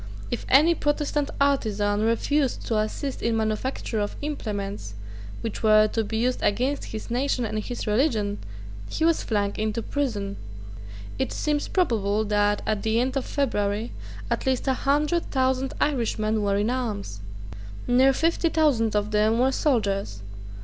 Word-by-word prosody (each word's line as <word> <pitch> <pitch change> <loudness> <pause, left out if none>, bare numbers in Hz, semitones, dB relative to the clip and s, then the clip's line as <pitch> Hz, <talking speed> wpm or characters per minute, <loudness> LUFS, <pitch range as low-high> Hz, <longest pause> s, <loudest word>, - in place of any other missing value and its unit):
If - - -3
any 305 +6 +6
Protestant 295 -1 0
artisan 210 -7 +1
refused 250 +5 +1
to 225 - 0
assist 255 +6 -3
in 230 - +1
the - - +1
manufacture 220 +1 -2
of 205 0 -2
implements 200 - -4 0.5
which 225 - -4
were 215 -1 +6
to 225 - 0
be 220 +1 -3
used 250 +2 0
against 255 +7 0
his 220 +1 -7
nation 250 0 0
and 215 0 -2
his 240 +3 -5
religion, 215 -3 +1 0.5
he 320 - 0
was 330 -1 +3
flung 205 -2 0
into 220 +1 -1
prison. 210 -9 -2 0.8
It 265 - 0
seems 295 -1 -1
probable 220 - +1
that, 205 0 +1
at 215 -2 0
the 220 +1 +1
end 260 +2 0
of 270 - -1
February, 220 -5 -1 0.4
at - - -1
least 260 +1 0
a 265 - +4
hundred 295 +6 +1
thousand 260 0 0
Irishmen 220 -6 0
were 200 -1 +1
in 210 +4 +1
arms. 210 - -3 0.7
Near 255 +2 +5
fifty 330 +4 +1
thousand 260 -10 +2
of 210 +1 0
them 215 +2 +3
were 255 +2 +3
soldiers. 200 - 0
230 Hz, 155 wpm, -25 LUFS, 210-270 Hz, 0.8 s, any